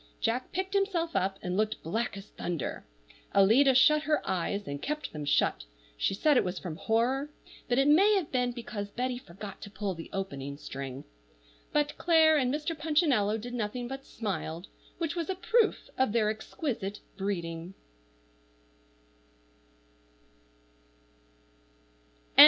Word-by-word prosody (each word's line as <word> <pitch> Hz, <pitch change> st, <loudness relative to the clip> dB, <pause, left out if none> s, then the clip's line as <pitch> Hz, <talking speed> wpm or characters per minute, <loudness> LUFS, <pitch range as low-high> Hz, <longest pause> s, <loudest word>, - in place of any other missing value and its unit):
Jack 250 Hz, +3 st, -1 dB
picked 380 Hz, +2 st, -2 dB
himself 380 Hz, -4 st, +1 dB
up, 195 Hz, 0 st, +1 dB
and 180 Hz, 0 st, -2 dB
looked 215 Hz, +2 st, 0 dB
black 220 Hz, +6 st, -2 dB
as 195 Hz, +1 st, -10 dB
thunder. 170 Hz, -5 st, -4 dB, 0.5 s
Alida 245 Hz, +8 st, +6 dB
shut 300 Hz, +4 st, +6 dB
her 300 Hz, 0 st, +2 dB
eyes, 195 Hz, +3 st, -1 dB
and 140 Hz, 0 st, -4 dB
kept 300 Hz, +1 st, -3 dB
them 150 Hz, -1 st, -4 dB
shut 145 Hz, -, +2 dB, 0.3 s
(she -, -, 0 dB
said 295 Hz, +6 st, +4 dB
it -, -, +4 dB
was 180 Hz, 0 st, -3 dB
from 175 Hz, -4 st, -5 dB
horror, 245 Hz, -, +1 dB, 0.4 s
but 245 Hz, -, +2 dB
it 270 Hz, +1 st, +4 dB
may 390 Hz, +8 st, +6 dB
have 365 Hz, -7 st, -1 dB
been 250 Hz, -1 st, +1 dB
because 220 Hz, -4 st, -5 dB
Betty 250 Hz, +3 st, -2 dB
forgot 195 Hz, -1 st, -9 dB
to -, -, -7 dB
pull 200 Hz, -1 st, -3 dB
the 165 Hz, -1 st, -9 dB
opening 140 Hz, -8 st, -4 dB
string), 135 Hz, -2 st, -6 dB, 0.7 s
but 295 Hz, 0 st, +1 dB
Clare 320 Hz, -2 st, +6 dB
and 255 Hz, -4 st, +2 dB
Mr. 305 Hz, +3 st, -2 dB
Punchinello 295 Hz, -, +2 dB
did 240 Hz, +3 st, -7 dB
nothing 240 Hz, +1 st, -2 dB
but 270 Hz, +2 st, -6 dB
smile, 175 Hz, -7 st, -4 dB, 0.3 s
which 335 Hz, -1 st, -2 dB
was 340 Hz, -1 st, -2 dB
a 380 Hz, -, 0 dB
proof 425 Hz, +5 st, +2 dB
of 260 Hz, -5 st, +3 dB
their 215 Hz, -2 st, +3 dB
exquisite 220 Hz, -, -4 dB
breeding. 175 Hz, -2 st, -3 dB
230 Hz, 140 wpm, -30 LUFS, 195-295 Hz, 0.7 s, Alida